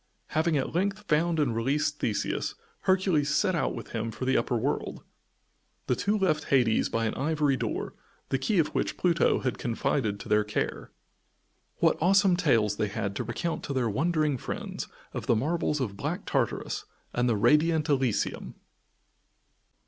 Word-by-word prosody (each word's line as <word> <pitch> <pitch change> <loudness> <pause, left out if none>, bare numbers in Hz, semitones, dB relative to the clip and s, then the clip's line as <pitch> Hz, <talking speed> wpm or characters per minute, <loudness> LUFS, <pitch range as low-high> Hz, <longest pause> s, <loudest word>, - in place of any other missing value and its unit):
Having 155 0 +1
at 135 - -2
length 200 +4 0
found 160 +2 +2
and 130 -7 +1
released 145 +5 0
Theseus, 105 - -1 0.3
Hercules 185 -6 +2
set 170 +6 +2
out 165 -6 0
with 115 - -8
him 115 0 -3
for 115 +3 -5
the 130 +1 +2
upper 120 - +1
world. 130 +6 -2 0.8
The 125 - +1
two 205 - 0
left 155 -7 +1
Hades 120 -5 +3
by 115 0 0
an 110 - -1
ivory 150 0 +1
door, - - -3 0.4
the 135 - 0
key 195 +10 0
of 160 - +3
which - - -2
Pluto 170 -2 +2
had 130 - -2
confided 110 -3 -1
to - - -9
their 105 0 +3
care. 105 - -3 0.9
What - - +2
awesome 190 +1 +5
tales 115 - +2
they 105 - 0
had 100 0 -3
to - - -1
recount 160 +9 -3
to 140 - -3
their 125 -4 0
wondering 155 +1 +1
friends - - -5 0.3
of - - -5
the 120 - +4
marvels 150 +4 0
of 105 -7 -3
Black - - -3
Tartarus - - -1 0.3
and 125 0 +1
of 110 -3 +1
Radiant 155 0 +4
Elysium! 130 -6 0
140 Hz, 165 wpm, -28 LUFS, 115-165 Hz, 0.9 s, awesome